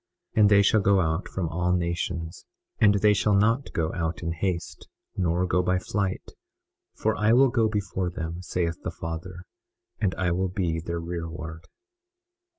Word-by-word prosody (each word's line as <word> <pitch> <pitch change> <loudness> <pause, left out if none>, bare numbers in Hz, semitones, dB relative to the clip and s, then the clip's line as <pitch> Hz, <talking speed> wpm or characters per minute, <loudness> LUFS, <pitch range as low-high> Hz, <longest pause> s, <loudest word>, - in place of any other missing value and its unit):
21:29 110 - +4
And 105 - +7
they 100 -1 +6
shall 105 +1 +4
go 100 0 +4
out 80 +1 0
from 95 -3 -3
all 90 +2 0
nations; 85 -1 -2 0.3
and 105 -3 +5
they 105 +1 +4
shall 105 0 +2
not 115 +7 +2
go 80 -1 -1
out 85 0 -3
in 85 - -1
haste, 85 +1 -3 0.3
nor 90 -1 +1
go 90 0 +2
by 90 +1 +1
flight, 95 +1 -3 0.6
for 110 +1 0
I 105 +2 +3
will 135 +2 +6
go 115 -3 +2
before 95 -3 -2
them, 85 0 -5
saith 85 -2 -2
the - - -2
Father, 85 +2 -6 0.6
and 90 -5 0
I 90 -2 0
will 95 +2 0
be 90 -3 -1
their 85 +1 -4
rearward. 85 -1 -6
90 Hz, 170 wpm, -26 LUFS, 85-100 Hz, 0.6 s, And